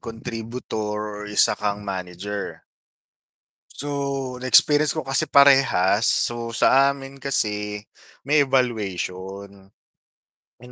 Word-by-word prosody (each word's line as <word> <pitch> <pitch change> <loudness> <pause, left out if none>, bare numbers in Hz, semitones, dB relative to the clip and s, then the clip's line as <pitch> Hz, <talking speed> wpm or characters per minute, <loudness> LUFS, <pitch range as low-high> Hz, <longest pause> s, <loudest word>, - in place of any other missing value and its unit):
contributor 115 -2 -6 0.2
or - - -7
isa 105 - +3
kang 105 0 -3
manager. 95 +1 -6 1.1
So, 145 - -6 0.5
na-experience 145 +3 +4
ko - - -3
kasi 135 +1 +1
parehas. 130 -8 +4
So, 120 -1 +1
sa 135 +4 +4
amin 135 0 -11
kasi 105 -6 -2 0.5
may 145 0 +4
evaluation. 100 -5 -3 0.8
'Yon 125 +1 -16
115 Hz, 95 wpm, -22 LUFS, 100-135 Hz, 1.1 s, na-experience